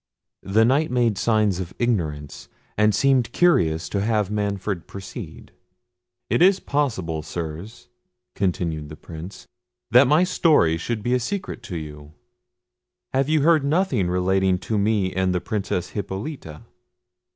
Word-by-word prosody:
The 110 Hz, +3 st, +3 dB
Knight 140 Hz, +6 st, +2 dB
made 120 Hz, -5 st, +1 dB
signs 105 Hz, -5 st, +2 dB
of 90 Hz, -1 st, -6 dB
ignorance, 80 Hz, -12 st, -2 dB, 0.3 s
and 105 Hz, -1 st, +3 dB
seemed 130 Hz, 0 st, +2 dB
curious 85 Hz, -, +2 dB
to 100 Hz, -, -1 dB
have 105 Hz, -2 st, 0 dB
Manfred 100 Hz, -3 st, -2 dB
proceed. 95 Hz, -1 st, -9 dB, 0.8 s
"Is 190 Hz, +2 st, +4 dB
it -, -, -20 dB
possible, 100 Hz, -, -1 dB
Sirs," 85 Hz, +7 st, -7 dB, 0.5 s
continued 85 Hz, -6 st, -2 dB
the 75 Hz, -, -8 dB
Prince, 85 Hz, +5 st, -10 dB, 0.5 s
"that 125 Hz, +2 st, +7 dB
my 150 Hz, +6 st, +4 dB
story 155 Hz, -, +3 dB
should 105 Hz, +5 st, -4 dB
be 120 Hz, -, 0 dB
a 125 Hz, -, +3 dB
secret 190 Hz, +1 st, -4 dB
to 90 Hz, -, -3 dB
you? 75 Hz, -1 st, -9 dB, 1.0 s
Have 135 Hz, +2 st, +1 dB
you 155 Hz, -1 st, +3 dB
heard 160 Hz, -2 st, +4 dB
nothing 140 Hz, -, +1 dB
relating 95 Hz, +1 st, +2 dB
to 105 Hz, +3 st, -2 dB
me 100 Hz, -2 st, +1 dB
and 95 Hz, -1 st, 0 dB
the -, -, +1 dB
Princess 95 Hz, -3 st, -3 dB
Hippolita?" 95 Hz, -, -6 dB
100 Hz, 140 wpm, -23 LUFS, 90-125 Hz, 1.0 s, that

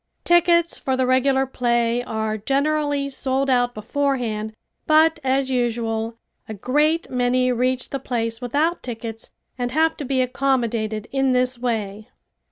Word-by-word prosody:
Tickets 340 Hz, -1 st, +3 dB
for 265 Hz, -1 st, -1 dB
the 260 Hz, -, +2 dB
regular 265 Hz, +1 st, +2 dB
play 240 Hz, -2 st, 0 dB
are 220 Hz, -2 st, -2 dB
generally 280 Hz, +4 st, 0 dB
sold 270 Hz, 0 st, -1 dB
out 245 Hz, -1 st, +2 dB
beforehand 225 Hz, -2 st, -2 dB, 0.3 s
but 315 Hz, +1 st, +4 dB
as 265 Hz, 0 st, +1 dB
usual 230 Hz, -2 st, -1 dB, 0.3 s
a 220 Hz, -, -5 dB
great 300 Hz, -, +1 dB
many 250 Hz, 0 st, +2 dB
reach 250 Hz, +1 st, -1 dB
the 275 Hz, -, -2 dB
place 230 Hz, -2 st, -3 dB
without 295 Hz, +8 st, 0 dB
tickets 225 Hz, -2 st, -7 dB, 0.3 s
and 245 Hz, 0 st, -1 dB
have 320 Hz, +4 st, +2 dB
to -, -, -5 dB
be 265 Hz, -1 st, -1 dB
accommodated 240 Hz, -4 st, 0 dB
in 270 Hz, -1 st, +1 dB
this 250 Hz, 0 st, +1 dB
way. 220 Hz, -4 st, -3 dB
255 Hz, 140 wpm, -22 LUFS, 230-275 Hz, 0.3 s, but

